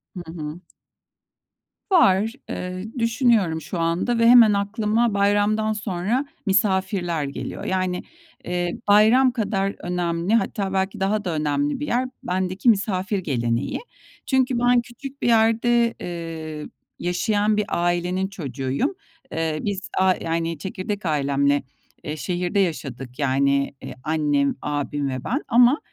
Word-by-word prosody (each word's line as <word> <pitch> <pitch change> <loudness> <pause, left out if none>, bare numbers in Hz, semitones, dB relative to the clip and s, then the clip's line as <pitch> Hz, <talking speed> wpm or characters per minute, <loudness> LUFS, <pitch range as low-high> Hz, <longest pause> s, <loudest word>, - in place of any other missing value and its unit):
Hı 175 -3 -7
hı. 155 -1 -6 1.3
Var, 220 - +4 0.2
eee, 185 +1 -4
düşünüyorum 225 -8 +2
şu 175 - -5
anda 170 +9 0
ve 230 - +5
hemen 235 -3 +8
aklıma 215 +3 +1
bayramdan 205 +2 +2
sonra, 210 +5 -1 0.2
misafirler 190 -4 +1
geliyor. 140 0 -5
Yani, 185 -1 -1 0.4
eee, 175 0 -2
bayram 220 +6 +6
kadar 200 -4 -1
önemli 175 +2 -1
hatta 195 -2 -1
belki 190 0 -1
daha 205 +2 0
da 175 -3 -1
önemli 145 - 0
bir 295 - -3
yer, 255 0 0
bendeki 185 +5 0
misafir 200 -2 +1
geleneği. 120 -7 -1 0.5
Çünkü 260 -2 +1
ben 245 0 +4
küçük 270 +4 -10
bir - - +1
yerde, 230 +1 +3
eee, 165 -3 -6 0.3
yaşayan 205 +4 +1
bir 210 - +1
ailenin 175 +2 0
çocuğuyum. 145 - -2 0.4
Eee, 160 -1 -1
biz 195 -2 -3
a 190 0 +5
yani, 165 0 -2
çekirdek 190 +5 -5
ailemle, 140 -2 +1 0.4
eee, 150 +1 -4
şehirde 175 +6 -1
yaşadık, 135 -8 -3
yani, 140 0 +1
eee, - - -7
annem, 150 -3 +1
abim 145 -1 -2
ve 130 -1 -4
ben 275 +6 -1
ama, 245 +5 +5
190 Hz, 125 wpm, -23 LUFS, 160-215 Hz, 1.3 s, hemen